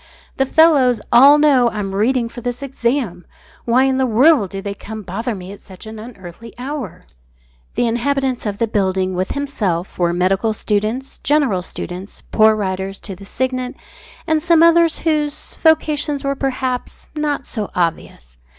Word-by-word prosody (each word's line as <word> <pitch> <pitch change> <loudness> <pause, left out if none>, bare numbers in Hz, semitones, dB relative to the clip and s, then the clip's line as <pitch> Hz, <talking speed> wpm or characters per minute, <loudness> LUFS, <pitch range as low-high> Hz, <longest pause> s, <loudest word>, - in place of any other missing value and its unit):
"The 270 - +1
fellows 280 -7 +4
all 275 +5 +8
know 275 -5 +4
I'm 205 -3 -4
reading 235 +4 +1
for 240 +1 -10
this 245 +2 -4
exam. 235 -8 -2 0.4
Why 240 +2 +3
in 265 -1 +1
the 260 -1 +1
world 245 - +4
do 195 - -6
they 200 0 -4
come 215 +2 -8
to - - -16
bother 225 +6 -3
me 185 0 -9
at 200 - -11
such 190 +1 -13
an 220 0 -8
unearthly 215 -1 -11
hour?" 250 - -6 0.7
The 245 - +1
inhabitants 255 +1 -1
of 200 -1 -3
the 230 - +1
building, 190 -3 0
with 185 +1 -2
himself, 205 -13 -3
were 175 -1 +2
medical 190 +5 +1
students, 215 +5 -2
general 275 -11 +1
students, 180 +1 -8
poor 220 0 +5
Writers 190 -1 -3
to 195 - -6
the 195 - -13
Signet, 255 +3 -3 0.5
and 315 -1 +1
some 335 0 +4
others 335 -1 +4
whose 305 -2 -2
vocations 305 -3 +2
were 275 0 0
perhaps 260 -2 -3
not 295 -2 -2
so 215 -4 -4
obvious. 110 - -3
235 Hz, 165 wpm, -18 LUFS, 195-275 Hz, 0.7 s, all